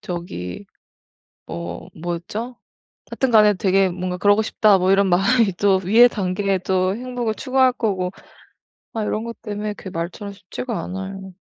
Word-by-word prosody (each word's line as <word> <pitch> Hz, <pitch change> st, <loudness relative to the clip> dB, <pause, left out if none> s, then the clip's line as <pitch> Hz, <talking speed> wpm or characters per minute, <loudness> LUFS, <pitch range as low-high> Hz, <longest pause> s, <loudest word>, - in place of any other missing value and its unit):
저기 100 Hz, -, -6 dB, 0.8 s
뭐 85 Hz, +1 st, -7 dB
뭐였죠? 175 Hz, +9 st, -5 dB, 0.5 s
하여튼간에 215 Hz, -5 st, +4 dB
'되게 190 Hz, 0 st, +2 dB
뭔가 180 Hz, 0 st, -4 dB
그러고 205 Hz, +3 st, +4 dB
싶다.' 215 Hz, -2 st, +3 dB
뭐 185 Hz, +1 st, +2 dB
이런 195 Hz, 0 st, +4 dB
마음이 195 Hz, +3 st, +3 dB
또 195 Hz, -1 st, +3 dB
위의 225 Hz, +7 st, +7 dB
단계에 195 Hz, -1 st, -1 dB
또 185 Hz, +1 st, 0 dB
행복을 245 Hz, -1 st, -3 dB
추구할 260 Hz, 0 st, +2 dB
거고 190 Hz, -6 st, -1 dB, 0.8 s
아 220 Hz, -2 st, -1 dB
요런 215 Hz, +1 st, -2 dB
것 230 Hz, -2 st, -8 dB
때문에 210 Hz, 0 st, -4 dB
그게 190 Hz, -, -9 dB
말처럼 180 Hz, +5 st, -5 dB
쉽지가 205 Hz, +4 st, -5 dB
않아요. 190 Hz, 0 st, -7 dB
195 Hz, 310 characters per minute, -21 LUFS, 185-220 Hz, 0.8 s, 위의